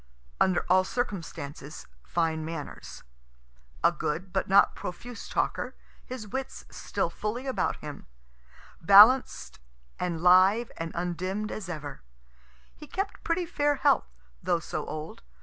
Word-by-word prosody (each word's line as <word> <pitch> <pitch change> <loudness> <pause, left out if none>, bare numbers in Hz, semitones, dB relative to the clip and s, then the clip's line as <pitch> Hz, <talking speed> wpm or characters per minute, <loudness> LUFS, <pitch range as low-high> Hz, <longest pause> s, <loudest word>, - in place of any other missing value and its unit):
Under 185 -2 +2
all 185 +1 +5
circumstances, 165 - -5 0.2
fine 160 -2 -1
manners; 160 -2 -7 0.8
a - - +6
good 180 +5 -4
but 190 - 0
not 195 +1 +6
profuse 235 +7 -7
talker, - - -1 0.3
his 250 -4 -7
wits 265 +6 -5
still - - -2
fully 235 +5 -4
about 265 - 0
him, 150 -1 -8 0.7
balanced 210 +9 +6 0.4
and 170 -2 -2
live 190 +6 +5
and 165 0 -4
undimm'd 185 +4 -2
as 195 -4 -6
ever. 150 -5 -6 0.7
He 300 - -12
kept 390 +5 -4
pretty 340 +1 0
fair 290 -3 +1
health, 280 -1 +2 0.3
though 175 0 +1
so - - -5
old. 155 0 -6
185 Hz, 125 wpm, -28 LUFS, 165-245 Hz, 0.8 s, a